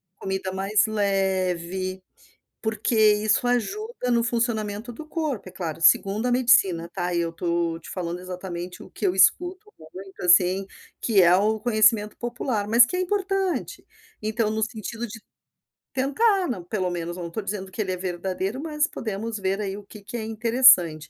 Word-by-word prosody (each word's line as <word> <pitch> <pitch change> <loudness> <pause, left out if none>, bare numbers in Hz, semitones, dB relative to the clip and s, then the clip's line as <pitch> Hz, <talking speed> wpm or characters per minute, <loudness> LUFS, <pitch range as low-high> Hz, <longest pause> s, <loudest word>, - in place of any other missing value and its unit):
comida 190 -1 -4
mais 195 +3 +1
leve, 190 -3 -1 0.6
porque 220 +1 -1
isso 215 +1 +3
ajuda 390 - -2
no 235 -1 +3
funcionamento 230 -1 -2
do 305 +7 -9
corpo 305 - -3
é - - -15
claro, 165 -3 -5
segundo 195 +7 +4
a 250 - +1
medicina 195 -9 +3
tá, 180 -1 -2
e 170 - +1
eu 170 - -1
estou 170 0 -2
te - - -12
falando, 175 -1 -4
exatamente 180 -1 -7
o - - -12
que - - -5
eu 185 - +2
escuto 360 - +2
muito, 185 +4 -11
assim, 185 +2 +4 0.4
que 210 -5 +4
é 175 0 +6
o 215 +3 +1
conhecimento 215 -2 +2
popular, 240 -3 -3
mas 235 +2 +7
que 360 - -5
é 365 - 0
importante. 385 -1 -2 0.4
Então 215 0 -1
no 220 0 -1
sentido 225 +1 -5
de 225 0 -10 0.7
tentar, 285 - +1
pelo 185 -4 -1
menos 175 0 -4
eu 180 - -6
não - - -4
estou 215 +6 -4
dizendo, 195 -1 -5
que 215 - -3
ele 190 -2 -2
é 185 - -2
verdadeiro, 190 +5 -3
mas 300 -1 0
podemos 220 -5 -5
ver 195 +1 -1
aí 195 -1 -4
o 205 - -10
que 210 +1 -13
que 205 - -9
é 220 - -4
interessante. 220 - +4
210 Hz, 175 wpm, -24 LUFS, 185-240 Hz, 0.7 s, mas